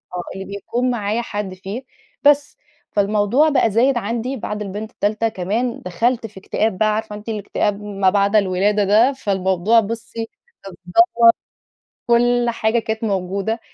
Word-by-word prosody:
آه 175 - -3
اللي 195 0 -6
بيكون 235 +5 -2
معايا 220 -1 -1
حد 205 -4 -5
فيه، 195 +7 -7 0.4
بس 290 0 +3 0.3
فالموضوع 210 +8 +2
بقى 255 -6 +2
زايد 245 +5 +3
عندي 235 +4 -3
بعد 210 -2 -5
البنت 210 +2 -5
التالتة 215 +1 0
كمان 220 +6 -2
دخلت 225 +6 0
في 200 -2 -13
اكتئاب 205 +1 -1
بقى، 215 +1 +2
عارفة 215 -1 -4
أنتِ 210 +2 -9
الاكتئاب 210 -1 -2
ما 200 -2 +1
بعد 200 +2 +1
الولادة 205 +1 +2
ده، 220 +7 +4
فالموضوع 195 -2 +2
بُصي 225 +1 -5 0.3
كان 195 - -9
دمّر 180 - +5 1.0
كل 240 0 +3
حاجة 225 0 0
كانت 220 0 -3
موجودة 200 +2 -2
215 Hz, 150 wpm, -20 LUFS, 200-235 Hz, 1.0 s, دمّر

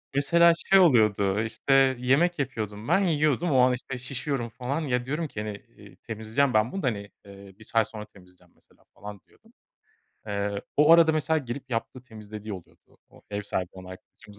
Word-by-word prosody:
Mesela 170 +4 +5 0.2
şey 195 0 +7
oluyordu; 105 - +3
işte, 135 +4 +2
yemek 145 +7 +2
yapıyordum, 110 -5 -4
ben - - +3
yiyordum. 155 -3 +1
O 130 - +3
an, 125 0 +4
işte, 130 +1 -6
şişiyorum 130 -1 -4
falan. 125 +7 -4
Ya, 125 -4 -1
diyorum 155 +5 -3
ki 110 - -6
"Hani, 105 -1 -5 0.2
eee, - - -15
temizleyeceğim 115 +5 -2
ben 110 +2 +2
bunu 195 - -5
da 130 - +1
hani, 100 -3 -3
eee, 100 -1 -14
1 - - -13
saat 110 0 +1
sonra 105 -1 -8
temizleyeceğim 90 -3 -21
mesela - - -28
falan," 105 -1 -10
diyordum. - - -26 0.7
Eee, 100 0 -3
o 150 +3 +6
arada 165 -1 +6
mesela 155 +1 +1
gelip 130 -1 -7
yaptığı, 120 +2 -4
temizlediği 110 -3 -9
oluyordu 90 -4 -13
o - - -19
ev 105 0 -3
sahibi 95 -3 -3
olan 95 -1 -11
arkadaşımız. 105 +2 -14
120 Hz, 185 wpm, -26 LUFS, 105-140 Hz, 0.7 s, şey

